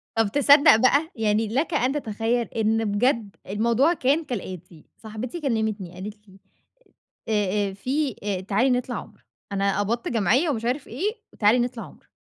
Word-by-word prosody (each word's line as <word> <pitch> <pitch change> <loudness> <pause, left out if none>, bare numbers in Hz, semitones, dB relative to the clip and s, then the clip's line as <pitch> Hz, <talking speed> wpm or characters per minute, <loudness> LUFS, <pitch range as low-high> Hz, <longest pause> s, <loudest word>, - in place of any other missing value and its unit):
طًبْ 225 -3 +1
تصدّق 285 -1 +6
بقى؟َ! 280 +7 +3
يعني 220 0 +1
لَك 280 +9 -1
أن 260 -3 +2
تتخيل، 230 -2 -1
إن 225 0 0
بجد 210 0 0
الموضوع 235 - +2
كان 295 +2 +1
كالآتي، 185 - -7
صاحبتي 230 +8 -7
كلمتني، 220 - -2
قالت 210 +3 -9
لي: 190 0 -18 0.9
"آآ، 205 -1 +1
آآ - - -8
في 265 +4 -2
آآ 195 -3 -2
تعالي 210 +7 +1
نطلع 250 -1 -1
عُمرة. 210 -1 -9 0.3
أنا 200 0 0
قبضت 230 +4 -1
جمعية 240 - +2
ومش 230 -4 -2
عارف 260 +3 -2
إيه، 365 - -2 0.2
وتعالي 220 +3 +3
نطلع 240 -1 -2
عُمرة." - - -16
225 Hz, 155 wpm, -24 LUFS, 205-260 Hz, 0.9 s, تصدّق